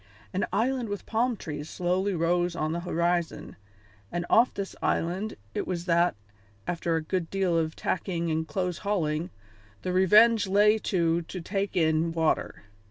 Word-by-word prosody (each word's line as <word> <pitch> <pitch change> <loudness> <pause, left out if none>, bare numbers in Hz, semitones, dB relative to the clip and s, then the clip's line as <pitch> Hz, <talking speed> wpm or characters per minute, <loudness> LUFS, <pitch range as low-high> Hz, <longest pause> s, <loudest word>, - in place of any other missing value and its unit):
An 190 - 0
island 240 +3 0
with 205 -1 -5
palm 235 +1 0
trees 150 -3 -6
slowly 185 +2 0
rose 175 +1 +1
on 155 -1 -1
the 170 - -2
horizon, 170 -1 -1 0.6
and 175 0 -2
off 235 +3 +5
this 200 -1 -5
island 190 +6 -1 0.2
it - - -3
was 175 -2 -3
that, 170 - +3 0.5
after 170 -1 -1
a 160 - -1
good 170 0 -2
deal 190 -3 0
of 160 -1 0
tacking 170 -3 -2
and 160 0 -1
close 180 +2 -2
hauling, 170 -5 -1 0.5
the 180 - -1
Revenge 210 +4 +5
lay 210 +3 +4
to 170 -4 +1
to 175 +3 -7
take 195 +3 -3
in 160 0 +2
water. 160 -1 0
175 Hz, 160 wpm, -27 LUFS, 165-200 Hz, 0.6 s, off